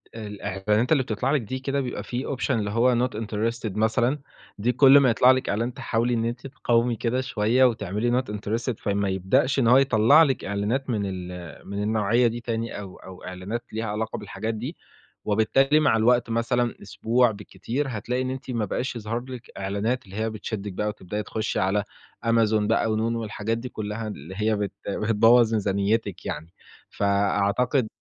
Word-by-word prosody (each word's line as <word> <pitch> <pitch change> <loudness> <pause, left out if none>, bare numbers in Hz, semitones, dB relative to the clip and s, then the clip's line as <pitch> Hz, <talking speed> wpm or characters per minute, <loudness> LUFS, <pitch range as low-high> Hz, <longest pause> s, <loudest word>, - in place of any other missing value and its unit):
الإعلانات 105 +2 -2
اللي 140 -4 +4
بتطلع 125 +4 -1
لِك 150 -4 +2
دي 130 +5 -5
كده 135 +1 -1
بيبقى 125 - -4
في 130 +3 -3
option 135 +1 -2
اللي 105 -4 0
هو 120 +3 +3
not 105 - -9
interested 110 -1 -3
مثلًا، 120 +6 +1 0.4
دي 115 +5 +1
كل 135 +3 +7
ما 130 -3 +4
يطلع 125 +2 +6
لِك 130 0 0
إعلان 115 +4 -1
تحاولي 120 +2 -1
إن 115 -1 0
أنتِ 120 +3 -4
تقاومي 120 -2 +1
كده 125 +3 -1
شوية 120 +1 +2
وتعملي 115 +2 +1
not - - -15
interested، 115 +4 -2
فما 100 -1 -1
يبدأش 95 +9 +1
إن 115 - +3
هو 125 +2 +7
يطلع 135 +4 +6
لِك 135 -4 0
إعلانات 105 +7 -1
من 110 -4 0
ال 90 -3 -7
من 100 +1 -3
النوعية 110 +3 +2
دي 115 +1 -3
تاني 115 -2 -3
أو 95 -2 -9
أو 95 -1 -12
إعلانات 95 +6 -5
ليها 110 +1 -2
علاقة 110 +1 -3
بالحاجات 105 +2 -4
دي، 125 +10 -6 0.5
وبالتالي 135 +8 +3
مع 140 -7 +3
الوقت 120 +1 +3
مثلًا، 120 +1 0
أسبوع 115 +4 +1
بالكتير، 105 +6 -4
هتلاقي 125 +3 -2
إن 130 - -2
أنتِ 130 0 -5
ما 115 -3 -1
بقاش 125 +5 -3
يظهر 115 +1 -3
لِك 125 -2 -9
إعلانات 100 +5 -2
اللي 95 +1 -12
هي 110 +1 -1
بتشدِك 105 -2 -5
بقى 105 +3 -2
وتبدأي 105 0 -4
تخشّي 110 +2 -2
على 95 +2 +1 0.4
Amazon 115 -1 +3
بقى 110 0 +2
ونون 115 +2 0
والحاجات 115 0 -2
دي 125 +2 -6
كلّها 110 +1 -5
اللي 90 -3 -8
هي 110 0 +1
بت 100 -1 -2 0.2
بتبوظ 115 +3 +4
ميزانيتِك 100 0 0
يعني. 80 +3 -5 0.4
فأعتقد 100 +5 +1
115 Hz, 180 wpm, -25 LUFS, 105-125 Hz, 0.5 s, كل